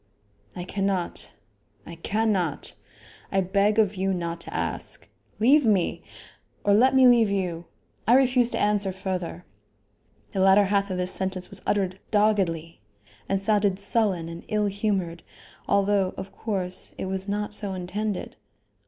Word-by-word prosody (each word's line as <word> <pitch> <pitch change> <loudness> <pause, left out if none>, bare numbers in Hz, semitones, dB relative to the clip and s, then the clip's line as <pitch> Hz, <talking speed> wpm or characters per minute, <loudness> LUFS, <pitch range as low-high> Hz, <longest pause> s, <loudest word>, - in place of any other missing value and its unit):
"I 180 - -4
cannot; 185 - -2 0.6
I 170 - -9
cannot. 190 -2 0 0.6
I 195 - +2
beg 200 +3 +2
of 210 -3 +3
you 190 -1 0
not 170 -1 -4
to - - -6
ask. - - -3 0.3
Leave 275 +7 +5
me! 205 -7 +1 0.6
or 205 - +4
let 260 +6 +5
me 260 -1 +7
leave 235 -3 +5
you. 180 -4 -2 0.4
I 240 - +6
refuse 250 -2 +4
to - - -2
answer 205 -2 +2
further." 185 -2 -4 0.9
The 195 - -1
latter 195 +2 +6
half 200 0 +1
of 185 - -2
this 180 0 0
sentence 190 -1 -3
was 200 - -6
uttered 190 -2 0
doggedly 190 - +1 0.5
and 195 - +1
sounded 200 -1 +1
sullen 200 -4 0
and 170 0 -8
ill 210 -1 +1
humored, 195 -4 -1 0.5
although, 200 -1 +2
of 195 - -7
course, 185 -4 -3
it - - -3
was 190 +1 -3
not 210 +1 -2
so 205 -2 -3
intended. 190 +3 -4
195 Hz, 145 wpm, -25 LUFS, 185-210 Hz, 0.9 s, me